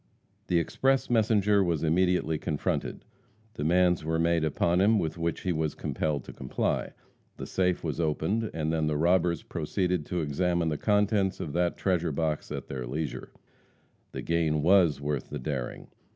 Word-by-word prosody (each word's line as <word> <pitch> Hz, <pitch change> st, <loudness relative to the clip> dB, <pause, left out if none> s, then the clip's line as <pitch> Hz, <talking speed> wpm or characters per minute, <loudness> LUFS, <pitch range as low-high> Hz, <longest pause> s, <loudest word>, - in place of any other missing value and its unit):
The 90 Hz, -, +2 dB
express 135 Hz, +10 st, +1 dB
messenger 105 Hz, -3 st, +3 dB
was 85 Hz, -4 st, 0 dB
immediately 80 Hz, -1 st, +2 dB
confronted. 75 Hz, -1 st, -2 dB, 0.5 s
Demands 90 Hz, +2 st, +2 dB
were 80 Hz, +1 st, 0 dB
made 85 Hz, 0 st, +2 dB
upon 85 Hz, +4 st, +1 dB
him 110 Hz, +3 st, +4 dB
with 80 Hz, -5 st, -1 dB
which 85 Hz, -1 st, -2 dB
he 90 Hz, -, -1 dB
was 80 Hz, -2 st, -1 dB
compelled 75 Hz, -4 st, -2 dB
to -, -, -10 dB
comply. 65 Hz, -, -2 dB, 0.4 s
The -, -, -6 dB
safe 90 Hz, -1 st, 0 dB
was 80 Hz, -1 st, -3 dB
opened, 85 Hz, +8 st, 0 dB
and 80 Hz, 0 st, -2 dB
then 80 Hz, -1 st, +1 dB
the 75 Hz, -1 st, 0 dB
robbers 85 Hz, 0 st, +2 dB
proceeded 90 Hz, -5 st, -2 dB
to 90 Hz, -2 st, -1 dB
examine 85 Hz, +3 st, 0 dB
the 75 Hz, -, -2 dB
contents 105 Hz, -2 st, +1 dB
of 75 Hz, -, -5 dB
that 85 Hz, 0 st, 0 dB
treasure 90 Hz, -4 st, 0 dB
box 75 Hz, +1 st, -2 dB
at -, -, -5 dB
their 65 Hz, -3 st, -5 dB
leisure. 75 Hz, +1 st, -4 dB, 0.8 s
The -, -, -6 dB
gain 80 Hz, -3 st, +1 dB
was 90 Hz, -4 st, +4 dB
worth 70 Hz, -2 st, -3 dB
the 75 Hz, -, -4 dB
daring. 65 Hz, -2 st, -4 dB
85 Hz, 165 wpm, -28 LUFS, 75-90 Hz, 0.8 s, him